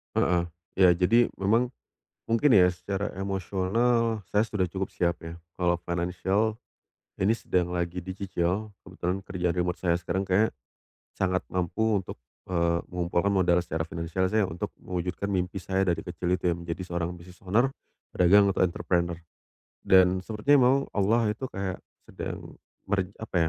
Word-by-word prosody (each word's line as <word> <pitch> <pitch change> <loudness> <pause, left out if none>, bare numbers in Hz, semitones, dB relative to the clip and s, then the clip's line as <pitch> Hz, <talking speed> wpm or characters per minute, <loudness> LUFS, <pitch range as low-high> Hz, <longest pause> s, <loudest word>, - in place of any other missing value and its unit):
Heeh. 90 -1 +3 0.3
Iya. 95 -1 +6
Jadi, 115 +7 +3
memang 115 +6 +2 0.6
mungkin 115 +5 +4
ya, 90 -3 +7
secara 100 +3 -3
emosional 100 +4 0
saya 105 +1 +3
sudah 105 -4 -1
cukup 95 +2 -3
siap, 85 -1 0
ya. 80 - -6 0.2
Kalau 90 -1 +2
finansial 90 +5 0 0.6
ini 95 +3 +3
sedang 90 -5 -1
lagi 90 0 -2
dicicil, 95 +2 -2
kebetulan 95 +1 -3
kerjaan 90 -2 -2
remote 90 0 -1
saya 85 -2 +2
sekarang 90 +2 -2
kayaknya 100 +4 +3 0.6
sangat 95 -1 0
mampu 100 +4 0
untuk, - - -9 0.3
eee, 85 -1 +1
mengumpulkan 90 +2 0
modal 90 -3 +3
secara 80 -1 -3
finansial 85 +2 -2
saya 110 +2 +2
untuk 80 +1 -5
mewujudkan 90 +2 -3
mimpi 90 0 -2
saya 95 +1 0
dari 85 -2 0
kecil 90 +1 -2
itu 90 -1 0
ya - - 0
menjadi 85 +1 -5
seorang 85 -1 -3
business 90 +1 -14
owner, 115 +8 +3 0.4
pedagang, 100 +3 +5
atau 95 - +2
entrepreneur. 85 0 -1 0.7
Dan 95 0 +6
sepertinya 115 +8 +3
memang 130 +2 +5
Allah 105 +2 +2
itu 110 +5 -5
kayak 95 -1 -4 0.3
sedang - - -7 0.3
meren 95 -1 -1
apa 110 - -4
95 Hz, 150 wpm, -27 LUFS, 90-100 Hz, 0.7 s, ya